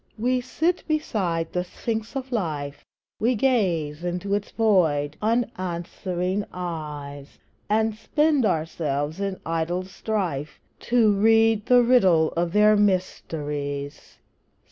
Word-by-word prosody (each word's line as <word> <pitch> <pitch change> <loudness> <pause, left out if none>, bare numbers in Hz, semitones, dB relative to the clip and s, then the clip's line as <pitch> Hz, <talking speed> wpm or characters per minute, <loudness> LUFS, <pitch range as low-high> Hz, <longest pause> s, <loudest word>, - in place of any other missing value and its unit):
We 250 +3 +1
sit 325 +8 -1
beside 190 - -1
the 180 - 0
Sphinx 220 +6 -4
of 265 -1 -4
Life, 150 - -3 0.4
We 240 +3 +2
gaze 175 - 0
into 180 +3 -2
its 205 0 -1
void, 160 -10 +2
unanswering 185 -3 -2
eyes, 150 -5 -6 0.3
And 220 +1 +2
spend 290 +6 +1
ourselves 155 -3 -1
in 195 -1 -3
idle 165 +2 -1
strife 185 -7 -3 0.3
To 230 -3 +4
read 225 +1 +3
the 245 -1 +6
riddle 190 -10 +4
of 170 0 -1
their 210 +2 +5
mysteries. 150 -8 -2
185 Hz, 110 wpm, -24 LUFS, 160-225 Hz, 0.4 s, the